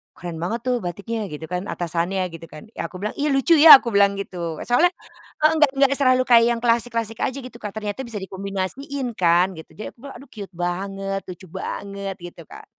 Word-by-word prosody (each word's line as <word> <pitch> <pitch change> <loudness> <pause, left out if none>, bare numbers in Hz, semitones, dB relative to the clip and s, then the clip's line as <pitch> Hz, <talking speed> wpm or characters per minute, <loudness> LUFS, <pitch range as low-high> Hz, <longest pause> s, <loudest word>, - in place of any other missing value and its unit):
keren 170 -2 -7
banget 220 +7 -3
tuh 250 - +2
batiknya," 205 +5 -4
gitu 150 -2 -8
kan, 180 +2 -3
"atasannya," 175 +2 -2
gitu 165 0 -10
kan 155 +7 -13
ya - - -3
aku 185 +2 -11
bilang, 210 - -1
"ih, 290 0 +1
lucu 270 +5 +1
ya," 305 -3 +11
aku 235 - -2
bilang 200 -1 +4
gitu. 170 -5 -5
E - - -4
soalnya, 345 +9 +4 0.5
heeh, 310 - +6
enggak 300 -3 +4
enggak 275 0 +4
selalu 255 -1 +4
kayak 235 -2 +6
yang - - -7
klasik-klasik 230 -1 0
aja 265 +1 -1
gitu 255 -2 -9
Kak 210 - -5
ternyata 210 +1 -4
bisa 230 - -7
dikombinasiin 200 +8 -4
kan 180 0 +3
gitu 160 - -12
jadi 215 - -7
aku - - -42
pula 280 -1 -9
aduh 275 - -14
cute 205 -3 -8
banget 195 +2 -3
lucu 185 +1 -10
banget 195 0 -5
gitu 175 -1 -11
Kak. - - -12
200 Hz, 210 wpm, -22 LUFS, 180-245 Hz, 0.5 s, ya